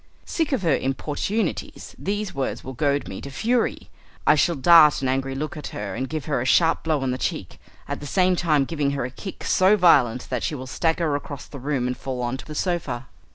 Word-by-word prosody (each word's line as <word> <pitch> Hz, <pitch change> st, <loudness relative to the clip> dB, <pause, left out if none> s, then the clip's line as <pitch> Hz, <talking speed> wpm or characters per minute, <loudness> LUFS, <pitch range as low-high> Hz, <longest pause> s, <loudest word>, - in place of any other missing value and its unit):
Sick 325 Hz, -3 st, -1 dB
of 260 Hz, -8 st, 0 dB
her 160 Hz, -5 st, +3 dB
importunities, 155 Hz, +9 st, -3 dB
these 205 Hz, 0 st, -3 dB
words 135 Hz, -1 st, -3 dB
will 130 Hz, -, -7 dB
goad 140 Hz, +2 st, 0 dB
me -, -, -7 dB
to 140 Hz, -, -7 dB
fury. 230 Hz, -, -1 dB, 0.3 s
I -, -, +7 dB
shall 165 Hz, +3 st, +2 dB
dart 150 Hz, 0 st, +6 dB
an -, -, +1 dB
angry 135 Hz, +1 st, -1 dB
look 150 Hz, +3 st, -4 dB
at 150 Hz, -, -6 dB
her 100 Hz, -2 st, -5 dB
and 130 Hz, +4 st, -3 dB
give 155 Hz, -2 st, -4 dB
her 145 Hz, -5 st, 0 dB
a -, -, -1 dB
sharp 165 Hz, +5 st, +3 dB
blow 155 Hz, -3 st, 0 dB
on 130 Hz, -, 0 dB
the 130 Hz, -, -3 dB
cheek, -, -, -4 dB, 0.3 s
at -, -, -4 dB
the 145 Hz, -, -7 dB
same 185 Hz, +3 st, +3 dB
time 155 Hz, -5 st, +2 dB
giving 145 Hz, -2 st, -1 dB
her 130 Hz, -, -1 dB
a 125 Hz, -, -6 dB
kick 190 Hz, +8 st, -8 dB
so 190 Hz, +3 st, +4 dB
violent 130 Hz, -, +4 dB
that 125 Hz, -3 st, -1 dB
she 155 Hz, -, -2 dB
will 130 Hz, -2 st, -6 dB
stagger 160 Hz, +2 st, 0 dB
across 145 Hz, 0 st, -6 dB
the 140 Hz, -, -10 dB
room 135 Hz, -1 st, -1 dB
and 125 Hz, 0 st, -1 dB
fall 130 Hz, -2 st, -4 dB
on 120 Hz, +1 st, -1 dB
to -, -, -10 dB
the 150 Hz, -, -7 dB
sofa. 160 Hz, -, -2 dB
145 Hz, 230 wpm, -24 LUFS, 130-170 Hz, 0.3 s, I